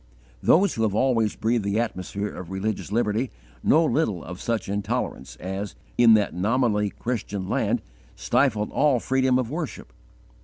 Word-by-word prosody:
Those 195 +5 +4
who 115 - -3
have 105 -3 +1
always 115 -3 +2
breathed 115 0 0
the 100 +2 0
atmosphere 105 -2 -3
of 90 - -8
religious 95 +1 -3
liberty 115 +2 +1 0.3
know 160 +2 +4
little 110 - 0
of 90 +4 -8
such 115 -3 -1
intolerance 100 -9 -3
as, 95 +2 -5 0.2
in 115 -2 +7
that 105 -2 +1
nominally 105 +2 +1
Christian 105 -5 -4
land, - - 0 0.3
stifled 105 0 +1
all 140 -4 +3
freedom 130 +1 +2
of 125 -1 -2
Worship. 150 - -5
110 Hz, 150 wpm, -25 LUFS, 100-125 Hz, 0.3 s, in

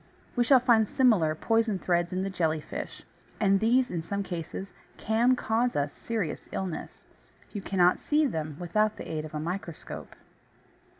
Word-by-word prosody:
We 245 - +3
shall 260 +2 +6
find 235 -3 +4
similar 200 -13 +3
poison 225 +2 +1
threads 175 -1 0
in 185 +1 -1
the 195 - -2
Jelly 160 -4 0
fish; - - -7 0.4
and 195 -2 +4
these, 245 +4 +3
in 170 -2 -2
some 200 +5 -3
cases, 180 +2 -6 0.2
can 235 +4 +3
cause 240 +1 0
us 145 0 0
serious 220 -8 -4
illness. 185 -4 -5 0.5
You 205 - -4
cannot 180 -2 +3
see 305 +1 +2
them 155 - -3
without 215 +5 +1
the - - -7
aid 155 -1 -3
of 155 - -9
a - - -1
microscope. 170 +1 -6
195 Hz, 165 wpm, -28 LUFS, 165-225 Hz, 0.5 s, shall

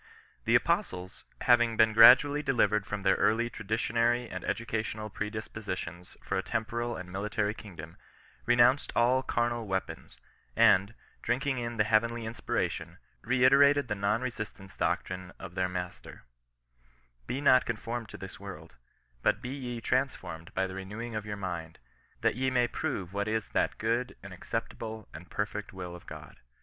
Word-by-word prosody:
The - - +4
Apostles, 90 +1 0 0.2
having 120 -2 +4
been 110 -1 +5
gradually 135 +6 +8
delivered 105 -7 +2
from 105 -1 -4
their 95 -1 +4
early 110 +4 +2
traditionary 115 +3 0
and - - -6
educational 110 -2 -3
predispositions 105 -5 -5
for - - -1
a - - 0
temporal 115 +3 -2
and 90 -3 -8
military 105 +2 -1
kingdom, 85 -7 -10 0.5
renounced 120 +3 +4
all 125 +2 +4
carnal 120 -3 -1
weapons, 95 -1 -4 0.4
and, 100 +4 +5 0.3
drinking 135 0 0
in 120 -1 -4
the 105 - +4
heavenly 115 +2 +2
inspira 110 +1 -1
tion, - - -8 0.2
reiterated 135 +2 +5
the - - +1
non 105 +3 0
resistance 110 -6 -6
doctrine 90 +2 -2
of 95 -3 -9
their 95 -1 0
Mas 90 -1 -5
ter: - - -13 0.5
" - - -36
Be 130 - -2
not 130 -3 +5
conformed 115 0 -4
to - - -9
this - - -9
world; - - -9 0.5
but 95 - +2
be 125 +2 -6
ye 125 -3 -5
trans 130 +3 +1
formed 80 0 -9
by 95 - +1
the 95 - -6
renewing 105 +5 -6
of 105 -1 -4
your 105 -1 -4
mind, 85 -4 -5 0.4
that - - +3
ye 130 +2 0
may 125 -2 +2
prove 95 -5 -3
what 100 +1 -1
is 110 -1 -1
that - - 0
good, 115 +3 -1
and - - -9
acceptable 110 -2 -5
and 80 +4 -10
perfect 105 0 -3
will 90 -2 -6
of 90 - -13
Gk)d." - - -10
110 Hz, 160 wpm, -30 LUFS, 95-120 Hz, 0.5 s, gradually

